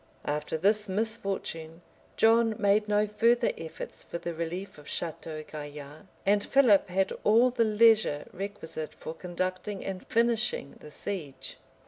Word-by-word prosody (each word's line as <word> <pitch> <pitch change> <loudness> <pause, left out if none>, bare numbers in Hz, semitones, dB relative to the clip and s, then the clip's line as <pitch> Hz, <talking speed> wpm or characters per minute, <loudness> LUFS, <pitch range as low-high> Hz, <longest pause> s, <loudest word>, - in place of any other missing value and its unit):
After 150 +2 -2
this 205 +4 +2
misfortune, 195 -6 -3 0.3
John 225 0 +4
made 205 +1 +3
no 210 0 +3
further 230 +3 +3
efforts 160 0 -8
for - - -5
the 170 0 -4
relief 170 +2 -5
of 145 - -14
Château 155 -2 -5
Gaillard: 150 +2 -9 0.2
and 205 +1 +3
Philip 240 -9 +5
had 190 +1 +1
all 235 +4 +5
the 240 -1 +2
leisure 215 -8 +4
requisite 190 -5 -5
for 160 - -7
conducting 185 +3 -4
and 190 -1 -5
finishing 230 -9 +1
the - - -11
siege. 155 -4 -6
195 Hz, 135 wpm, -29 LUFS, 160-215 Hz, 0.3 s, Philip